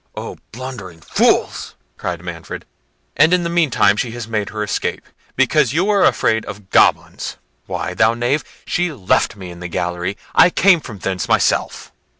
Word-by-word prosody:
"O - - -7
blundering 110 -8 -8
fools!" - - +1 0.2
cried 85 -1 -5
Manfred; 85 -2 -7 0.5
"and 155 +6 +5
in 180 - -1
the 170 - -2
meantime, 155 -12 +3
she 115 +3 -2
has 120 -2 -6
made 105 -3 -2
her 105 -1 -3
escape, 105 - -2 0.3
because 135 -1 +2
you 170 +5 +2
were 200 -2 +3
afraid 110 0 +2
of 100 -2 -10
goblins!—Why, - - 0
thou 110 +1 +3
knave! 120 +5 0 0.2
she 175 0 0
left 105 -6 +1
me 95 -3 -9
in 85 - -11
the 90 - -5
gallery; 90 +2 -3 0.2
I - - +7
came 185 0 +4
from 115 -8 -9
thence 95 -1 -3
myself." - - +1
110 Hz, 160 wpm, -19 LUFS, 95-150 Hz, 0.5 s, I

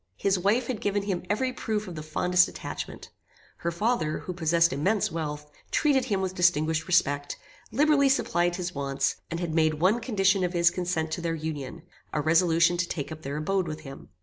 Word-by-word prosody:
His 195 -2 +1
wife 210 +7 +2
had 235 -3 -4
given 205 0 0
him 190 -3 -2
every 255 +5 0
proof 215 -4 -3
of 180 - -6
the 155 - -6
fondest 180 +4 +2
attachment. - - -7 0.5
Her 170 - -2
father, 170 -3 0
who 180 - -6
possessed 170 -1 +2
immense 190 +9 +1
wealth, 150 -2 -5 0.2
treated 275 -4 +2
him 200 -6 0
with 185 -1 -2
distinguished 165 -2 +2
respect, 145 -6 +1 0.3
liberally 280 +2 +4
supplied 175 -9 +1
his 180 -1 -4
wants, 140 -1 -1
and 170 - -3
had 170 -3 -3
made 155 -1 +3
one 185 +9 +2
condition 195 -5 +2
of 180 0 -1
his 170 0 +4
consent 175 -3 -2
to 165 - -3
their 165 -1 -1
union, 155 -1 -5 0.3
a - - 0
resolution 165 +2 +3
to 170 0 0
take 145 -2 -4
up 155 0 -7
their 140 -1 -4
abode 185 +4 0
with 155 0 -5
him. 135 -3 -11
175 Hz, 195 wpm, -27 LUFS, 155-195 Hz, 0.5 s, liberally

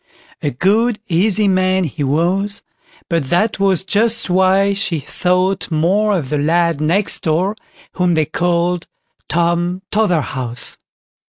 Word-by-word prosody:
A 145 - 0
good, 210 - +1
easy 205 +4 +2
man 185 0 +2
he 155 -2 -3
was, 180 +8 0 0.4
but 165 -5 -1
that 195 +5 +1
was 195 -2 +2
just 220 +1 +1
why 190 +2 +3
she 185 -5 -1
thought 180 +5 -1
more 190 +6 +1
of 135 -6 -5
the 150 - 0
lad 165 +1 +1
next 175 +7 +1
door, 175 +6 0 0.4
whom 180 -2 +1
they 155 -1 +2
called 175 +2 -1 0.4
"Tom 175 +2 0
Totherhouse". 140 - -1
180 Hz, 125 wpm, -17 LUFS, 165-195 Hz, 0.4 s, why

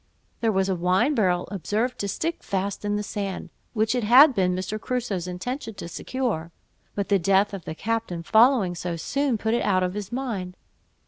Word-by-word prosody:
There 225 -2 +2
was 190 -1 +1
a 190 - +1
wine 185 - +2
barrel 185 -8 +1
observed 210 +7 -2
to 200 - -1
stick 330 - -2
fast 195 +1 -3
in 205 0 0
the 210 - -1
sand, 200 -2 -4 0.2
which 220 0 +1
it 245 -2 0
had 260 +7 +8
been 180 -4 +1
Mr. 190 +4 -4
Crusoe's 230 -8 -2
intention 225 +6 -5
to 170 - -7
secure; 175 -3 -3 0.4
but 200 -1 -2
the 200 -1 +4
death 195 +3 +3
of 190 -4 -6
the 160 - -5
captain 220 -5 -2
following 225 -3 +4
so 175 0 -4
soon, 275 - 0
put 220 +1 -1
it 240 - +1
out 185 -2 +2
of 180 0 -1
his 205 +1 -5
mind. 220 -8 -4
205 Hz, 195 wpm, -25 LUFS, 185-235 Hz, 0.4 s, had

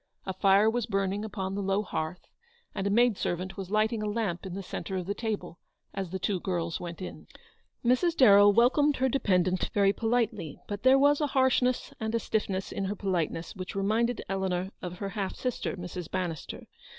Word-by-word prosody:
A 190 - -3
fire 195 +2 +4
was 235 0 0
burning 195 +1 -1
upon 195 -3 -4
the 200 - -2
low 195 +1 +1
hearth, 160 -2 -4 0.5
and 195 - -2
a - - +1
maid 235 0 +3
servant 185 +2 -2
was 195 -2 -6
lighting 215 +1 +1
a 210 - -1
lamp 205 -5 -2
in 180 - -6
the 195 - -5
centre 190 +1 -5
of 180 -2 -2
the 200 - -1
table 215 -6 -4 0.3
as 195 -2 -4
the 190 - -3
two 190 0 -1
girls 170 -2 -2
went 175 +1 -6
in. - - -8 0.6
Mrs. 290 +8 +3
Darrell 205 -5 +8
welcomed 260 +7 +4
her 265 0 +1
dependant 185 -8 +1
very 200 -1 +4
politely 225 - -1
j - - -19
but 205 -1 -4
there 260 +1 +6
was 285 +2 +4
a 295 - +2
harshness 255 -1 +2
and 220 0 -2
a - - +2
stiffness 195 -4 -2
in 195 - -2
her 200 +2 -2
politeness 175 -4 -2
which 185 0 -6
reminded 220 +5 0
Eleanor 190 -1 -1
of 180 0 -6
her 200 +1 -4
half 195 -2 -3
sister, 250 -5 -3
Mrs. 180 -1 -6
Bannister. 175 -4 -4
200 Hz, 200 wpm, -29 LUFS, 185-225 Hz, 0.6 s, Darrell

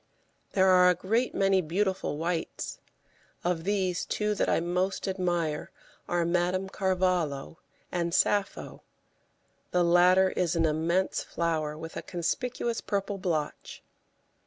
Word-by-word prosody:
There 190 -1 +4
are 180 -1 +6
a 180 - +3
great 225 +8 0
many 195 -1 +3
beautiful 185 -1 -1
whites; 165 +1 -3 0.6
of 175 -1 -1
these, 190 -3 0
two 210 0 -1
that 205 - 0
I - - +3
most 180 +4 -1
admire 175 -5 -1 0.4
are 175 -1 +1
Madame 180 +2 0
Carvalho 180 -7 -1 0.3
and 170 -1 -1
Sappho; 205 +3 0 0.9
the 180 -1 +2
latter 180 +2 +5
is 175 -2 0
an 165 -1 +2
immense 165 +4 +1
flower, 155 -3 -2
with 160 +1 -8
a - - -3
conspicuous 235 +7 -2
purple 200 -1 -2
blotch. 160 -5 -3
180 Hz, 125 wpm, -28 LUFS, 170-190 Hz, 0.9 s, are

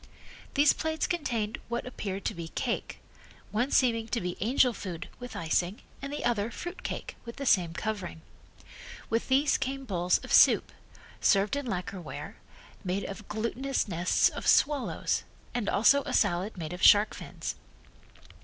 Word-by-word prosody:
These 290 0 +6
plates 315 0 -1
contained 235 -11 -2
what 235 0 -3
appeared 200 -6 -5
to - - 0
be 170 -1 -6
cake, - - -3 0.5
one 240 +6 +1
seeming 230 -5 +2
to 235 - -1
be 180 -2 -3
angel 250 +3 +3
food 180 -5 -6
with 245 0 -8
icing, 175 +5 -1 0.2
and 275 0 -5
the 295 - -3
other 225 -3 +1
fruit 350 +10 -7
cake - - -5
with 235 -1 -8
the 275 - -5
same 175 -8 +3
covering. 190 -7 -4 0.9
With 230 +1 0
these 275 +2 +3
came 270 +1 -3
bowls 180 -5 +2
of - - -4
soup, - - +6 0.5
served 200 +5 +3
in 285 -2 -3
lacquer 185 -2 -3
ware, 165 - -8 0.5
made 190 +1 -1
of 195 +2 -7
glutinous 230 +5 -1
nests 175 -1 +3
of - - -6
swallows, 290 -3 +2 0.3
and 240 -4 -1
also 275 +7 +5
a - - -3
salad 195 +1 +1
made 160 -1 -5
of 180 - -7
shark 205 +1 +7
fins. - - -6
220 Hz, 160 wpm, -29 LUFS, 185-260 Hz, 0.9 s, shark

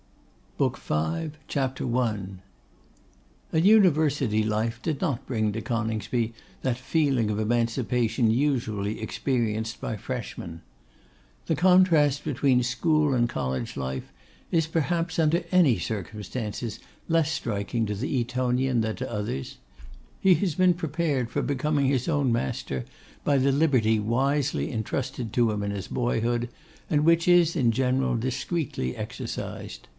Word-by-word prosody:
BOOK - - +1
V. 80 - -2 0.2
CHAPTER 130 -3 -1
I. 120 -4 +1 1.3
An 160 +2 +2
University 150 - +4
life 110 +2 -1
did 155 -4 -2
not 140 -10 -1
bring 110 -4 0
to 110 - -3
Coningsby 115 0 -1 0.3
that 125 -2 0
feeling 130 -4 +1
of 105 - -2
emancipation 115 +1 +1
usually 110 -5 0
experienced 115 -2 -1
by 110 - -3
freshmen. 100 -9 -6 0.9
The - - +2
contrast 165 -6 +4
between 130 -2 +2
school 150 +4 +2
and 120 -2 +2
college 65 - -3
life 65 -1 -4 0.4
is 165 -2 +2
perhaps, 165 +1 -1
under 165 +2 +2
any 170 -10 +4
circumstances, 105 +2 -4 0.3
less 165 -2 +2
striking 115 -5 -2
to 105 - -2
the 130 +5 -1
Etonian 125 0 0
than 110 0 -1
to 130 -1 -4
others: 105 - -4 0.6
he 190 -1 +5
has 185 -4 0
been 185 0 +4
prepared 155 -6 -1
for - - -1
becoming 145 +1 0
his 130 -2 +1
own 145 -6 +2
master 65 - -2 0.4
by 145 -1 +3
the 135 +1 +3
liberty 130 -7 +3
wisely 135 +6 0
entrusted 115 0 -3
to 120 -2 +3
him 105 -1 -2
in 100 - -2
his 100 -2 -5
boyhood, 120 0 0 0.4
and 150 -1 +2
which 165 +1 +4
is, 175 -2 +5
in 125 -7 +3
general, 130 +1 +1
discreetly 125 - -2
exercised. - - -6
125 Hz, 130 wpm, -26 LUFS, 110-150 Hz, 1.3 s, he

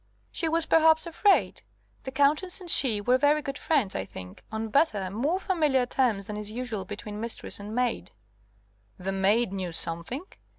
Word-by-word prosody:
"She 330 - -1
was 330 0 +1
perhaps 320 0 +4
afraid. 385 +4 +1 0.4
The 265 - -5
Countess 295 +7 +3
and 355 -3 -1
she 230 -6 +3
were 245 +5 +2
very 295 +1 +2
good 275 -1 -5
friends, 275 -12 0
I 95 - -3
think. 90 -1 -11
On 220 0 -4
better, 210 - +1
more 285 - -1
familiar 305 -10 +1
terms, 240 -6 0
than 210 +1 -6
is 210 0 -3
usual 225 -3 -4
between 210 0 -7
mistress 230 -2 -2
and 205 +2 -7
maid." 245 -1 -1 0.9
"The 190 +1 -4
maid 195 +3 +1
knew 185 -3 -4
something?" 170 - +1
245 Hz, 170 wpm, -27 LUFS, 205-300 Hz, 0.9 s, perhaps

